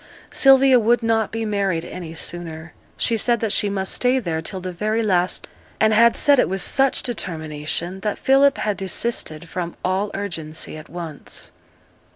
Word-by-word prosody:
Sylvia 270 -1 +6
would 235 +1 +2
not 225 -1 +1
be 225 0 -3
married 195 -5 -1
any 170 -2 -8
sooner; 165 -1 -5 0.2
she 230 - +1
said 235 +2 +1
that 220 -2 +1
she 205 - +2
must 190 -1 -2
stay 250 +1 +2
there 170 -10 -2
till 190 +4 -5
the 185 0 -5
very 215 +5 -1
last; 185 -3 0 0.3
and 220 0 +4
had 230 +1 +5
said 285 -3 +4
it - - +2
with 190 0 0
such 270 -1 +2
determination 165 - -4
that 210 +1 -2
Philip 275 +2 +4
had 210 -2 -1
desisted 190 -5 -2
from 170 0 -5
all 190 +3 0
urgency 160 -7 -5
at 155 0 -11
once. 165 -4 -6
195 Hz, 170 wpm, -21 LUFS, 170-230 Hz, 0.3 s, Sylvia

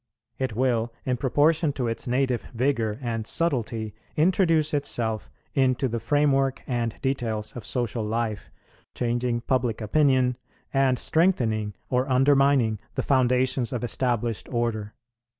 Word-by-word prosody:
It 130 -5 -2
will, 120 -2 +1
in 125 -1 0
proportion 150 +4 +2
to 130 -3 -2
its 115 +3 -3
native 125 -1 +1
vigour 115 -4 0
and 115 -2 -3
subtlety, 115 -9 0 0.2
introduce 165 -2 +3
itself 115 -7 -1 0.2
into 130 -1 +2
the 115 -1 -3
framework 135 0 +1
and 120 -3 -2
details 115 -6 -2
of 120 - -6
social 120 -1 -2
life, 110 0 -2 0.5
changing 120 0 -1
public 120 -3 0
opinion, 130 +1 +2 0.4
and 135 -2 +3
strengthening 115 - +1 0.2
or 130 +2 +1
undermining 135 -4 +3 0.2
the - - -1
foundations 130 -2 +2
of 125 -1 -3
established 120 -2 -1
order. 115 -3 -2
125 Hz, 125 wpm, -25 LUFS, 115-135 Hz, 0.5 s, introduce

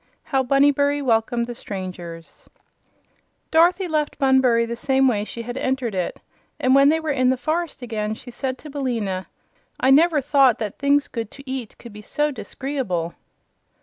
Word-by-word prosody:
How 270 -2 0
Bunnybury 285 +2 +3
Welcomed 235 -2 +1
the 240 - -6
Strangers 180 -6 -8 1.0
Dorothy 355 +3 +4
left 305 -2 -1
Bunbury 260 -4 +3
the 235 0 -4
same 265 +2 +2
way 210 -5 +1
she 230 +2 -7
had 245 +2 -6
entered 260 -4 -1
it 185 -2 -3 0.4
and 255 - +3
when 275 +1 +6
they 320 +1 +2
were 315 -1 -2
in 255 -2 +2
the 260 - +2
forest 315 0 -2
again 215 -2 -3
she 245 - -11
said 260 +1 -3
to 300 - -11
Billina: 225 -9 -2 0.5
"I 260 - +3
never 315 +2 +5
thought 275 -3 +4
that 210 -3 -5
things 285 +1 +2
good 230 -3 -5
to 275 +2 -14
eat 260 -4 -5
could 235 -3 -12
be 210 - -10
so 295 +7 -1
dis'gree'ble." 260 - -3
260 Hz, 170 wpm, -22 LUFS, 225-285 Hz, 1.0 s, when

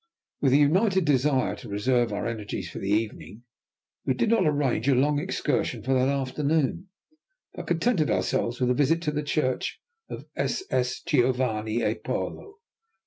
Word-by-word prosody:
With 135 -2 +3
a - - +7
united 185 +5 +3
desire 135 -5 +2
to - - -10
reserve 120 +3 +1
our 105 - -3
energies 105 -6 -4
for - - -7
the 95 - -4
evening, 110 +1 -2 0.6
we 130 - 0
did 170 - +1
not 215 -8 +3
arrange 145 -3 0
a 135 - +4
long 145 +3 +2
excursion 125 -6 -1
for 130 +2 +1
that 130 +1 +3
afternoon, 140 +5 0 0.7
but - - -8
contented 175 -1 +1
ourselves 95 +6 0
with 125 -1 +2
a - - +4
visit 150 +5 +2
to 150 - 0
the 150 0 -2
church 145 -3 -1 0.3
of - - -7
SS. 125 - -1
Giovanni 120 -6 +1
e - - +2
Paolo. 410 - -5
130 Hz, 160 wpm, -26 LUFS, 120-150 Hz, 0.7 s, a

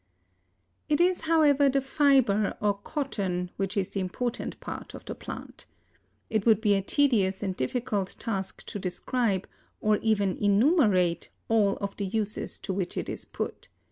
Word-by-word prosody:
It 295 - +2
is, 360 +1 +3
however, 300 -4 +4
the 275 +1 +2
fiber, 270 -7 +3
or 205 -1 +2
cotton, 200 - -3
which 195 +2 -2
is 190 -2 0
the 195 - -2
important 230 +6 -3
part - - -7
of - - -11
the - - -4
plant. - - -9 0.6
It 220 -3 0
would 220 -2 +5
be 210 -2 +3
a 195 - +2
tedious 205 -5 +2
and 190 -2 -2
difficult 200 - -2
task 195 -5 -4
to 205 - -5
describe, 195 +2 -1 0.3
or 215 0 +3
even 205 -4 +1
enumerate, 205 - +3 0.2
all 210 -3 +3
of 200 -1 -4
the 200 - -2
uses 210 +1 -3
to 190 - -2
which 185 -2 -3
it - - -3
is - - -5
put. - - -5
210 Hz, 160 wpm, -28 LUFS, 195-255 Hz, 0.6 s, would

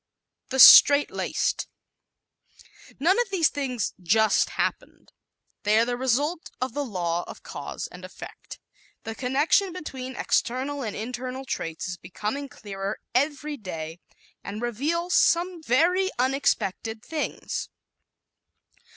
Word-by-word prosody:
The 265 - -2
Straight 285 +2 +9
Laced - - -1 1.3
¶ - - -34
None 370 - +3
of 480 - -3
these 360 -5 +3
things 255 -7 -3
"just 215 +5 +3
happened." - - -4 0.5
They 210 +1 +3
are 230 - +4
the 245 0 -2
result 280 +7 0
of 255 -2 -2
the 290 - -2
law 175 -7 -2
of - - -11
cause - - -6
and - - -11
effect. - - -10 0.4
The 225 - -5
connection 285 - +2
between 260 -7 -7
external 270 +5 -1
and 220 -5 -4
internal 250 +4 -5
traits 165 -10 -4
is 180 -2 -5
becoming 220 +12 -5
clearer 200 -7 -6
every 290 +3 0
day 165 - -7 0.4
and 205 +2 -6
reveals 300 +10 -1
some 345 0 +3
very 340 +8 +2
unexpected 230 -4 -1
things. 315 -2 -4
260 Hz, 125 wpm, -25 LUFS, 220-295 Hz, 1.3 s, Straight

